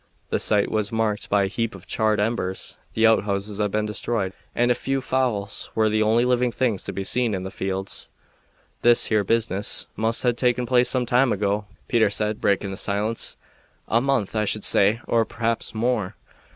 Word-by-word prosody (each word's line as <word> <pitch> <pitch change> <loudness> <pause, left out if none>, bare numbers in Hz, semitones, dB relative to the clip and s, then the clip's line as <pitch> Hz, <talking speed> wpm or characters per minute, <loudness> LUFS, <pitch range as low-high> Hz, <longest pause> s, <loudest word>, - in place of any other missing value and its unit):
The - - 0
site 105 -1 +2
was 105 -2 -1
marked 110 -2 -1
by 100 -1 +3
a - - 0
heap 115 +2 -3
of 95 - -13
charred 110 -1 0
embers. 105 -3 -2 0.2
The 110 - +2
outhouses 105 -2 +1
had 105 -1 +1
been 105 +1 -1
destroyed, 105 -2 -2 0.2
and 120 +1 +2
a - - +6
few 135 +2 -2
fowls 125 -7 -2
were 110 -1 +3
the 110 0 +1
only 115 +3 +3
living 125 -1 +1
things 115 -5 -1
to - - -3
be 100 - -4
seen 115 +1 +1
in 95 - -4
the 95 - -6
fields. 95 0 -2 0.7
"This 120 0 +5
here 110 -2 +2
business 110 -1 +2
must 110 +2 0
have 120 -2 +1
taken 125 0 +1
place 125 0 +3
some 125 -1 +1
time 125 +1 +3
ago," 105 +1 -1 0.2
Peter 110 -3 +3
said, 105 +1 -1
breaking 100 0 +1
the 95 - -6
silence. 105 +3 -2 0.5
"A 115 - +2
month, 130 -7 0
I 105 0 +1
should 105 +1 -1
say, 105 +4 +3
or 115 -1 +3
p'r'aps 115 +1 -3
more." 110 -4 -1
110 Hz, 190 wpm, -23 LUFS, 100-120 Hz, 0.7 s, a